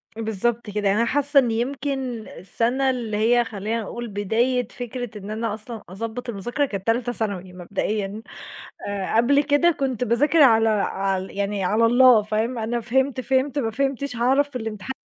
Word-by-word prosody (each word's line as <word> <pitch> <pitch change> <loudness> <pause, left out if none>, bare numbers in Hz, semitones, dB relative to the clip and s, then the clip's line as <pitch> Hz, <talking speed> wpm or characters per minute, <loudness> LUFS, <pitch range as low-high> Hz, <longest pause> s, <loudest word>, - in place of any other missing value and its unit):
بالضبط 225 +1 -2
كده. 205 0 -1
يعني 195 +1 +3
أنا 235 - +3
حاسّة 285 +3 +3
إن 245 -3 +1
يمكن 255 -1 -3
السنة 240 +8 -1
اللي 230 -5 -2
هي 240 +3 +3
خلّينا 220 +1 -3
نقول 240 +3 -6
بداية 225 +4 0
فكرة 245 -2 -6
إن 200 0 -8
أنا 220 -1 -2
أصلًا 220 0 -8
أضبط 230 +5 -5
المذاكرة، 240 +7 -1
كانت 200 -6 -6
تالتة 240 +1 +1
ثانوي 195 -6 -3
مبدئيًا. 200 +3 -3 0.7
آآ، 200 +1 -2
قبل 280 +5 +4
كده 290 +4 +3
كنت 265 -6 -1
باذاكر 290 +7 +3
على 225 -4 +6
ع 195 -2 0
يعني 200 +1 -3
على 215 +5 +3
الله، 245 -1 +6
فاهم؟ 220 +4 -1
أنا 230 +2 -2
فهمت، 260 +3 0
فهمت، 265 +2 0
ما 225 -5 0
فهمتش 275 +1 -2
هاعرف 265 +5 +2
في 260 - -8
الامتحان 220 +1 -5
230 Hz, 165 wpm, -23 LUFS, 210-255 Hz, 0.7 s, على